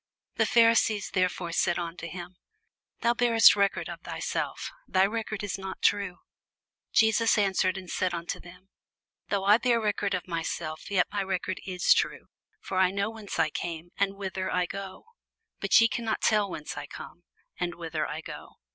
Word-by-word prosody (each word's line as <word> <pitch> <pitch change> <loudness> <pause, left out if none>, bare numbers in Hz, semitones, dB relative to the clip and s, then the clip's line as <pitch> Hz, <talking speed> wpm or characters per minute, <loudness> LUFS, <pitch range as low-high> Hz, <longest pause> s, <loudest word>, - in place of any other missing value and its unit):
The - - +3
Pharisees 230 -3 +4
therefore 180 -2 0
said 175 +1 +1
unto 170 -1 -5
him, 175 +2 -8 0.7
Thou 235 0 +3
bearest 235 -1 +6
record 200 -1 +1
of - - -7
thyself; - - -3 0.2
thy 185 - +3
record 215 0 -3
is 195 -2 -3
not 190 0 -7
true. 200 -3 +2 0.7
Jesus 225 +1 +4
answered 190 -2 +2
and 185 -1 -8
said 185 +1 -1
unto 170 0 -4
them, 180 +2 -15 0.6
Though 195 -1 0
I 210 +3 +6
bear 245 -2 +2
record 205 -2 0
of 180 - -5
myself, 165 -2 -4
yet 190 -3 +3
my 205 - -1
record 190 -1 -3
is 180 -2 +4
true: - - -2 0.3
for 185 - -3
I 185 -1 +5
know 200 +3 -1
whence 220 -3 -7
I 155 - +2
came, 170 +1 -5
and 200 0 0
whither 190 -1 -3
I 180 0 +1
go; 195 - -7 0.5
but - - +5
ye 230 - +6
cannot 225 -1 -2
tell 210 -2 +3
whence 150 -4 -6
I 145 0 -6
come, 175 - -10 0.4
and 175 -1 -2
whither 165 -2 -3
I 150 +2 -5
go. - - -9
190 Hz, 175 wpm, -28 LUFS, 175-205 Hz, 0.7 s, bearest